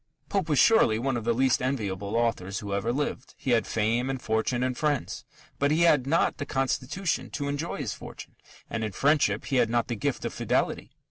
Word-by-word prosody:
Pope 190 -5 -1
was 150 - +2
surely 130 - +5
one 130 +2 -1
of 115 -2 -3
the 120 - +2
least 130 +1 +2
enviable 105 -6 -2
authors 115 -5 0
who 100 -2 -4
ever 100 +4 0
lived. 135 -1 -3
He 130 - -2
had 115 -2 +2
fame 115 +4 0
and 135 -1 -2
fortune 110 +2 0
and 130 0 -1
friends. 145 -1 -2 0.3
But 140 - +2
he 155 +3 +2
had 150 -6 +4
not 165 +4 +2
the 145 - -3
constitution 135 +6 -1
to 145 -2 -2
enjoy 145 +4 -3
his 125 -9 -3
fortune, - - -11 0.3
and 115 -1 -3
in 105 -2 -3
friendship 145 +7 +2
he 135 - 0
had 120 -2 +3
not 120 +1 0
the 120 - -1
gift 100 - -2
of - - -3
fidelity. - - -1
125 Hz, 210 wpm, -27 LUFS, 115-145 Hz, 0.3 s, surely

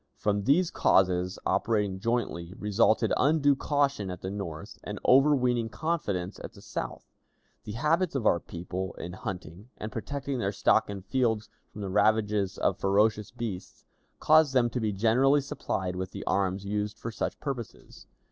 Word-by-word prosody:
From 100 -1 0
these 165 +7 +3
causes, 90 -1 +2
operating 105 -4 0
jointly, 95 -6 -2
resulted 110 +2 +2
undue 145 0 +4
caution 140 -7 0
at 90 -1 -6
the 95 - -4
North 100 -1 -6
and 105 -1 -6
overweening 125 -4 +4
confidence 105 - -2
at - - -8
the - - -14
South. - - -5 0.6
The 105 - -6
habits 155 - +1
of 125 -5 -1
our 85 - +4
people 90 +3 -6
in 90 +1 -7
hunting, 90 +3 -7
and 110 - -6
protecting 140 +3 -4
their 100 -2 -1
stock 95 - +3
in 100 -2 -6
fields 110 -1 0 0.2
from 105 - -9
the 100 - -3
ravages 105 -1 +2
of - - 0
ferocious 105 +2 +2
beasts, 115 -6 -7 0.3
caused 155 -3 +4
them 120 -2 +3
to 125 - -2
be 110 -2 0
generally 120 +8 +3
supplied 95 -9 -3
with 95 0 -3
the - - -7
arms 95 0 0
used 105 +1 -2
for 115 - -5
such - - -3
purposes. 135 -6 -7
105 Hz, 160 wpm, -28 LUFS, 95-130 Hz, 0.6 s, undue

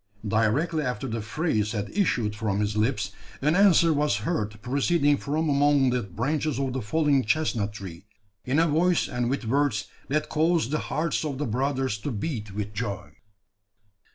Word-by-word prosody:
Directly 125 +10 +1
after 125 -1 -3
the 115 -1 -3
phrase 110 -3 -1
had 105 -2 -3
issued 120 - +1
from 105 -2 -1
his 105 0 -1
lips, 105 -2 0 0.3
an 150 +4 +2
answer 180 -4 +5
was 150 -6 +1
heard 105 0 -2
proceeding 145 +3 +2
from 155 +4 -1
among 140 -2 +3
the 125 0 +1
branches 135 - -2
of 135 -2 -1
the 130 - -2
fallen 140 +4 +2
chestnut 110 -5 0
tree, 95 -2 -9 0.4
in 130 +4 0
a 165 +1 +4
voice 170 +3 +2
and 120 -1 -1
with 135 -2 -2
words 120 -4 0 0.2
that 150 +2 0
caused 160 -4 +1
the 155 - +1
hearts 165 +2 0
of 145 -4 -3
the 145 - -2
brothers 130 -1 -1
to 125 - -4
beat 110 -2 -4
with 105 +1 -4
joy. 105 -2 -4
130 Hz, 170 wpm, -26 LUFS, 105-150 Hz, 0.4 s, answer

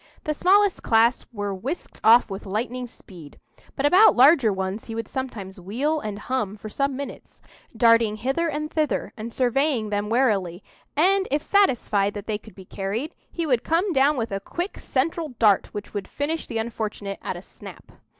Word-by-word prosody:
The 305 - -1
smallest 390 +4 +3
class 230 +2 +3
were 205 -3 -3
whisked 260 - -6
off 235 +2 +7
with 195 0 -7
lightning 245 +5 -3
speed; 170 -10 -13 0.4
but 275 - -1
about 370 +9 +6
larger 265 -3 +6
ones 190 +2 -3
he 225 - -6
would 225 -1 -4
sometimes 210 -8 -6
wheel 270 - -1
and 210 -7 -5
hum 215 -2 -3
for 215 +1 -8
some 275 +4 -1
minutes, 280 +1 -8 0.4
darting 230 -1 +4
hither 270 +10 -1
and 305 0 -3
thither, 305 -3 -1
and 230 +1 -6
surveying 255 -2 +1
them 205 0 -1
warily, 205 -7 +1 0.3
and 380 +6 +3
if 290 +2 0
satisfied 225 - +2
that 205 0 -6
they 215 -1 -2
could 220 - -16
be 190 - -12
carried, 205 +11 -4 0.2
he 335 - -3
would 250 -6 +1
come 350 +4 +1
down 280 +1 +3
with 230 -3 -2
a 195 - -2
quick, 350 - -5
central 300 +1 -2
dart 210 -4 +4
which 205 -1 -7
would 205 -2 -4
finish 310 +3 -3
the 230 - -4
unfortunate 215 -3 -4
at - - -4
a - - -10
snap. - - -13
235 Hz, 180 wpm, -24 LUFS, 205-290 Hz, 0.4 s, off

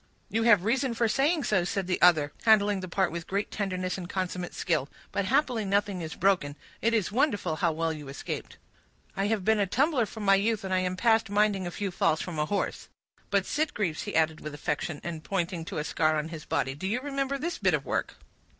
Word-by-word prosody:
"You 225 - +1
have 215 -5 +5
reason 250 +1 +1
for 230 0 +2
saying 285 +7 +2
so," 190 -4 +2
said 195 +1 -2
the 180 0 -1
other, 155 -5 +5
handling 205 -3 +4
the 185 - -5
part 190 0 +1
with 170 0 -5
great 200 +2 -2
tenderness 185 -2 -2
and 175 -1 -7
consummate 180 -1 -3
skill. 155 -6 0 0.2
"But 200 - -1
happily 250 -1 +1
nothing 200 -1 0
is 160 -1 -5
broken. 180 -7 +1 0.3
It 230 +1 +2
is 210 -4 0
wonderful 205 - +1
how 170 -1 +2
well 165 +1 -1
you 150 -2 -8
escaped!" 135 +1 -6 0.6
"I 195 +1 0
have 210 -3 -1
been 220 -1 +3
a 200 - +2
tumbler 260 - +2
from 220 0 -8
my 195 - +6
youth, 210 +2 +1
and 190 -1 -2
I 185 - +3
am 185 0 -1
past 225 0 +3
minding 205 -2 +2
a - - -2
few 195 +2 -3
falls 160 -2 +1
from 170 -4 -4
a 150 - +1
horse; 205 - -2 0.4
but, 200 -2 +2
Sitgreaves," 210 - -1
he - - -5
added 160 -1 +2
with 150 -1 -6
affection, 145 +1 -3
and 165 -2 -5
pointing 175 -3 -2
to - - -5
a 150 - -1
scar 155 0 +1
on 155 +1 -2
his 160 -2 -8
body, 135 - -1
"do 150 +7 -5
you 230 +5 0
remember 275 0 -2
this 340 +5 -3
bit - - +3
of - - -4
work?" - - -2
195 Hz, 225 wpm, -28 LUFS, 170-220 Hz, 0.6 s, my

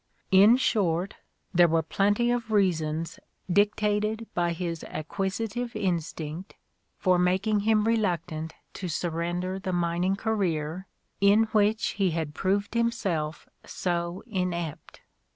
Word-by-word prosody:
In 205 +6 +7
short, 190 -6 0 0.4
there 175 -1 +6
were 165 0 +2
plenty 205 +8 +1
of 240 -2 -2
reasons 165 -6 0 0.3
dictated 210 +2 +1
by 175 -1 +1
his 170 -1 -4
acquisitive 205 +8 -3
instinct 170 -1 -3 0.4
for 185 -2 +3
making 190 +4 +2
him 215 +1 +3
reluctant 175 -8 -1 0.2
to 185 - -5
sur 170 +1 -2
render 175 +3 -2
the 190 -1 -3
mining 175 +2 +1
career 190 -5 -2 0.3
in 200 +2 +5
which 215 +1 +2
he 190 - +4
had 155 -2 -3
proved 200 +5 0
himself 195 -10 -1 0.2
so 175 0 -3
inept. 180 -7 -4
185 Hz, 115 wpm, -27 LUFS, 170-210 Hz, 0.4 s, In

